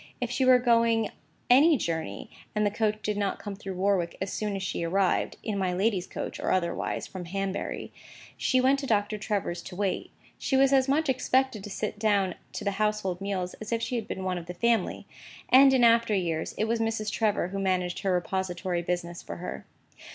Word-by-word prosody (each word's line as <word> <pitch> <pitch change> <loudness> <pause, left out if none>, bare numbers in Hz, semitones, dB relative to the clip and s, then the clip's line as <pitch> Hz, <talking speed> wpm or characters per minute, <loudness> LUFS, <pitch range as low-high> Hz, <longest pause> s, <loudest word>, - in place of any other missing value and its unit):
If 245 -1 -2
she 260 +2 +1
were 255 0 +7
going 230 -2 +3 0.4
any 290 +5 +6
journey, 160 - -4 0.2
and 210 0 +2
the 205 - +2
coach 215 0 -1
did 210 -1 -1
not 200 -1 -1
come 205 -2 -6
through 195 -2 -7
Warwick 185 -2 0
as 190 0 -3
soon 210 -2 -2
as 195 - -3
she 185 - -2
arrived 185 +2 +1
(in 210 -3 -2
my 185 -2 0
lady's 190 -1 0
coach - - -5
or - - -1
otherwise) 170 -2 -1
from 185 -2 -7
Hanbury, 195 +2 -3 0.4
she 260 - +2
went 265 +2 +3
to 275 - -4
Doctor 210 -1 +1
Trevor's 200 -5 -2
to 180 - -9
wait. 195 0 -1 0.3
She 265 - +1
was 270 0 +5
as 265 -1 +4
much 305 +4 +2
expected 260 -4 +1
to - - -7
sit 210 +1 -4
down 200 -4 +2 0.2
to - - -5
the 200 - 0
household 210 -4 0
meals 190 -2 -2
as 215 - -6
if 230 0 0
she 250 - -2
had 230 -3 -3
been 190 - -4
one 185 -1 -1
of 170 - -11
the 180 - -6
family: 235 +3 +1 0.4
and 270 +1 +8
in 260 -2 +4
after 230 -2 +5
years 165 -4 -2
it 215 - +1
was 230 +1 0
Mrs. 225 -1 -1
Trevor 210 -5 +1
who 195 +1 -4
managed 185 -2 0
her 195 -2 0
repository 180 -1 -1
business 175 0 -3
for - - -7
her. 180 - -7
205 Hz, 210 wpm, -28 LUFS, 185-230 Hz, 0.4 s, and